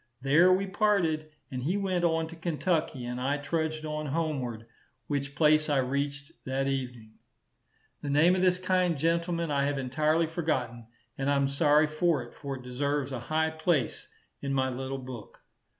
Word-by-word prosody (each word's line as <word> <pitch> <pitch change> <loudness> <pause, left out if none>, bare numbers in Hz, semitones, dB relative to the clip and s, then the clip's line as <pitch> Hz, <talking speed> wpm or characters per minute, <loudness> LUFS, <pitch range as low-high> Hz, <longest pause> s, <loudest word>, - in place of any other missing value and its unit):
There 150 +8 +5
we 190 +2 +3
parted, 190 -6 +1 0.2
and 130 -1 -3
he 170 +10 0
went 185 -3 0
on 165 -1 +2
to 165 - -9
Kentucky 160 -4 -1
and 125 +1 -4
I 140 +3 +1
trudged 155 +1 -2
on 150 0 -3
homeward, 135 -7 -2 0.4
which 140 +1 -3
place 155 +1 +4
I 145 - +2
reached 140 +2 -2
that 135 +1 -1
evening. 125 -5 -4 0.8
The 145 - -4
name 155 +5 +5
of 185 - 0
this 180 -1 +4
kind 185 -2 +1
gentleman 170 +1 0
I 140 -1 +2
have 145 0 -1
entirely 155 +5 +1
forgotten, 130 -9 -2 0.3
and 135 +1 0
I 145 - +3
am 140 0 +2
sorry 150 +2 +4
for 155 -2 +1
it; 120 - -13
for 140 -2 -5
it 130 - -12
deserves 140 +2 -1
a 130 - -3
high 155 +6 0
place 160 -5 0 0.3
in 140 -1 -2
my 130 -1 +1
little 130 +2 -4
book. 125 -4 -10
145 Hz, 175 wpm, -29 LUFS, 135-165 Hz, 0.8 s, There